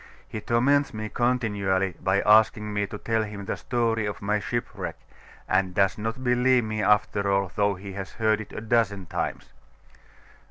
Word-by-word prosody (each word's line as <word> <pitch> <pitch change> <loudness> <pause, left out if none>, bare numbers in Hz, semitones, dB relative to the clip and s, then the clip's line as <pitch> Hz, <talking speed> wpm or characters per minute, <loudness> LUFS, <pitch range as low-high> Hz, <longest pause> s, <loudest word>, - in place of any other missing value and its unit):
He 110 - -6
torments 125 +4 +2
me 110 0 -4
continually 100 -7 0
by 95 +2 +2
asking 105 0 +4
me 105 0 0
to 105 +1 -7
tell 115 +1 0
him 105 -2 -6
the - - -2
story 115 -3 0
of 105 - -5
my 105 +1 0
shipwreck, 120 +3 -4 0.5
and 95 -1 +1
does 100 -1 +3
not 115 +4 -4
believe 125 0 +3
me 110 -1 -3
after 100 0 +2
all, 100 -2 +1
though 100 -1 +2
he 95 +1 -9
has 95 -2 -6
heard 110 -1 +1
it 105 - -10
a - - -6
dozen 110 -4 +1
times. - - -4
105 Hz, 170 wpm, -26 LUFS, 100-115 Hz, 0.5 s, asking